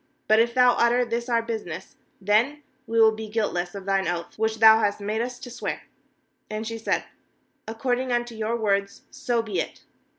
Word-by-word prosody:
20But 215 - +7
if 235 +1 +2
thou 250 -1 +6
utter 240 +1 +3
this 235 +1 -3
our 230 -1 +2
business, 205 -7 -6 0.2
then 230 +9 +1 0.2
we 230 0 0
will 220 -1 +7
be 220 0 -7
guiltless 200 -5 -2
of 195 -1 -7
thine 195 -2 +1
oath 170 -1 -3
which 220 0 0
thou 220 0 +8
hast 205 -2 0
made 210 +2 -2
us 245 +1 -4
to 245 -1 -10
swear.7 - - -4 0.8
21And - - -8
she 225 +1 -5
said: 225 - 0 0.6
'According 245 +3 -1
unto 240 0 -1
your 220 +1 -2
words, 200 -3 -1
so 240 -3 -1
be 205 -6 -3
it.' - - -5
225 Hz, 190 wpm, -25 LUFS, 205-235 Hz, 0.8 s, thou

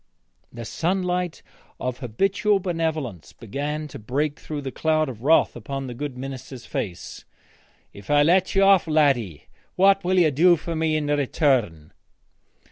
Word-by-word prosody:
The 115 -1 -8
sunlight 180 - -2 0.4
of 125 0 -4
habitual 195 - +1
benevolence 160 - -3
began 145 +6 -4
to - - -9
break 140 +7 -2
through 150 -2 -6
the 135 -1 -5
cloud 155 +1 0
of 115 -4 -9
wrath 155 +5 +3
upon 135 +4 -5
the 125 - -6
good 135 +1 -6
minister's 130 -1 -8
face. 90 -4 -5 0.7
'If 100 -1 -13
I 145 0 +5
let 180 +5 +2
you 195 - +4
off, 195 -3 +5
laddie, 135 - +1 0.3
what 195 +1 +4
will 185 +1 +1
you 165 -4 +4
do 175 +6 +5
for 165 +1 -5
me 160 -1 +1
in 150 - -2
return?' 130 - 0
150 Hz, 150 wpm, -23 LUFS, 125-170 Hz, 0.7 s, I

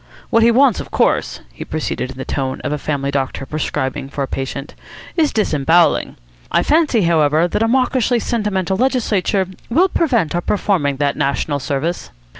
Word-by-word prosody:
What 230 - +4
he 230 - +6
wants, 250 -1 +4
of - - -7
course," - - 0
he - - -7
proceeded 130 - -3
in 130 - -9
the 130 - -5
tone 130 -2 -3
of - - -3
a 150 - -3
family 140 -2 -2
doctor 135 -1 -2
prescribing 140 -2 -3
for 140 0 -3
a - - -3
patient, 135 +2 -5 0.4
"is 315 -4 +2
disembowelling. 165 -4 +2 0.4
I - - +3
fancy, 295 - +2
however, 160 -1 +3
that 175 - -2
a 225 - +3
mawkishly 250 0 +2
sentimental 200 -5 -1
legislature 210 -6 +1 0.2
will 345 +11 +3
prevent 240 - +1
our 175 - 0
performing 175 -8 0
that 140 0 -1
national 140 +1 -1
service. 140 +6 -3
170 Hz, 170 wpm, -18 LUFS, 140-230 Hz, 0.4 s, he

